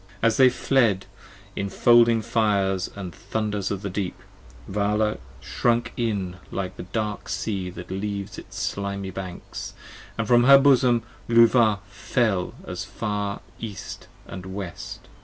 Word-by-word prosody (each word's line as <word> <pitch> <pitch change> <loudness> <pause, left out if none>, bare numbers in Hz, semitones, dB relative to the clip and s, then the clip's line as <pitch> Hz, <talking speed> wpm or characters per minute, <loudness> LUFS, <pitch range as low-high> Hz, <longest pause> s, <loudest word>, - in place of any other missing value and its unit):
And - - -21
as 110 - -1
they 130 -1 +7
fled 120 -5 +2 0.5
in 100 - -2
folding 115 0 +5
fires 100 -4 +1 0.2
& - - -18 0.2
thunders 105 -3 -1
of 100 0 -3
the 100 - -2
deep, 90 -2 -3 0.5
Vala 105 +2 0 0.2
shrunk 120 0 0
in 100 -6 -2
like 95 -1 -4
the - - -7
dark 105 0 -3
sea 95 0 -2
that 90 0 -9
leaves 100 +1 -4
its - - -11
slimy 100 -1 -3
banks, 95 -1 -7 0.4
And 115 -2 -1
from 120 +1 +5
her 140 +1 +10
bosom 130 -4 +4 0.3
Luvah 115 -3 +5
fell 100 -1 0
far 105 -1 -3
as - - -14 0.2
the - - -4
east 100 -2 -8 0.2
and 95 +1 -8
West. 95 -2 -7
105 Hz, 140 wpm, -25 LUFS, 95-115 Hz, 0.5 s, her